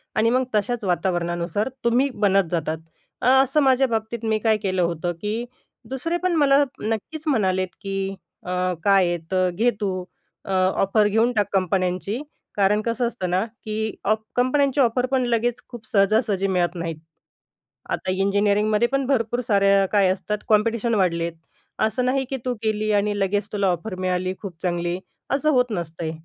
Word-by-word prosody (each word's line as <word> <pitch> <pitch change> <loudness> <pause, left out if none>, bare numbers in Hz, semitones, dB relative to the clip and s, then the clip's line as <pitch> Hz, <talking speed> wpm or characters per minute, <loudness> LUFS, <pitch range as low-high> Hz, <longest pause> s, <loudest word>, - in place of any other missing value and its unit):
आणि 220 +1 +3
मग 255 +2 +2
तशाच 220 +2 0
वातावरणानुसार 175 +3 -1 0.2
तुम्ही 250 +4 +3 0.2
बनत 195 -3 +3
जाता. 160 -2 -1 0.5
अ, - - +1 0.2
असं 275 +3 +1
माझ्या 265 0 +4
बाबतीत 225 0 -3
मी 220 -1 +1
काय 220 0 +2
केलं 185 -1 +1
होतं 170 0 -1
की 215 +3 -2 0.5
दुसरे 330 +7 -2
पण 360 -2 +2
मला 285 -1 +5 0.2
नक्कीच 225 +9 -3
म्हणालेत 190 -9 +1
की 195 -1 -2 0.3
"अ, 180 - -5 0.3
काय 195 -3 +4
आहे. 175 0 0
तर 185 -1 +2
घे 225 +7 +2
तू 185 -2 -1 0.4
अ, - - -5
ऑफर 195 +3 +2
घेऊन 225 +4 +2
टाक 205 -2 +2
कंपन्यांची." 185 - 0 0.3
कारण 205 +1 +3
कसं 235 +2 -1
असतं 190 -6 -4
ना 185 +3 +1 0.2
की 220 0 -3
ऑफ 215 +2 +2 0.2
कंपन्यांची 275 +3 +2
ऑफर 245 +1 +2
पण 260 -1 +2
लगेच 240 0 0
खूप 240 -3 -10
सहजा-सहजी 200 -1 +2
मिळत 180 -2 0
नाहीत. 165 -2 -4 0.9
आता 185 - -1
इंजिनिअरिंगमध्ये 205 +3 +2
पण 275 -1 +1
भरपूर 240 -3 +1
साऱ्या 200 -4 +3
काय 200 -3 +4
असतात, 210 +3 -1
कॉम्पिटिशन 230 +2 +2
वाढलेत. 170 -3 +1 0.5
असं 250 +3 +1
नाही 265 +1 +1
की, 270 - -2
तू 250 - 0
गेली 215 0 0
आणि 205 0 +1
लगेच 200 +1 0
तुला 200 -2 +1
ऑफर 185 +3 -2
मिळाली 185 0 -1
खूप 195 -5 -7
चांगली. 175 0 -1 0.3
असं 285 +3 +2
होत 250 -4 +2
नसतं. 165 -3 -4
210 Hz, 160 wpm, -23 LUFS, 185-235 Hz, 0.9 s, मला